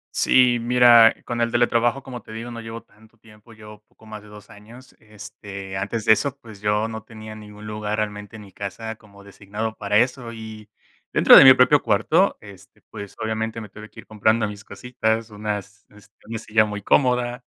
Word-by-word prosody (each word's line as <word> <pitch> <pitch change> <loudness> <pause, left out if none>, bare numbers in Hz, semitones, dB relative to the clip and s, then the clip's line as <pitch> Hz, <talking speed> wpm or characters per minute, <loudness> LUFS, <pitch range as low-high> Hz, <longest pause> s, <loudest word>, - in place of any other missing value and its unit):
Sí, 125 -2 +3
mira, 120 -1 +6
con 120 -1 -4
el 115 0 0
teletrabajo, 120 +2 +1
como 125 -3 -9
te 110 - -14
digo, 115 +2 -7
no 115 -1 -8
llevo 115 0 -9
tanto 110 +2 -25
tiempo, 110 +1 -19
llevo 105 -1 -14
poco - - -24
más 110 -1 -10
de 105 - -17
2 105 0 -15
años, 115 +5 -16
este, 100 -2 -11
antes 105 +3 -4
de - - +6
eso, 140 +4 0
pues, 110 -6 -14
yo 105 +1 0
no 110 -1 -7
tenía 110 0 -11
ningún 105 0 -12
lugar, 105 0 -4
realmente, 105 0 -5
en 105 - -11
mi 100 -2 -16
casa, 110 +4 -7
como 100 -2 -19
designado 105 +3 -6
para 105 0 -2
eso. 125 0 0
Y 110 -1 -11 0.5
dentro - - +7
de - - +10
mi - - +9
propio - - +4
cuarto, - - +1
este, 100 -2 -16
pues, 100 -2 -10
obviamente, 110 +1 -4
me 105 - -11
tuve 105 +1 -12
que - - -13
ir - - -23
comprando 110 +1 0
mis 105 0 -9
cositas, 115 -3 -3
unas 105 0 -6
este, 105 0 -21
una 115 0 -5
silla 110 0 +1
muy 105 -1 -6
cómoda, 125 -1 +1
110 Hz, 200 wpm, -22 LUFS, 105-115 Hz, 0.5 s, de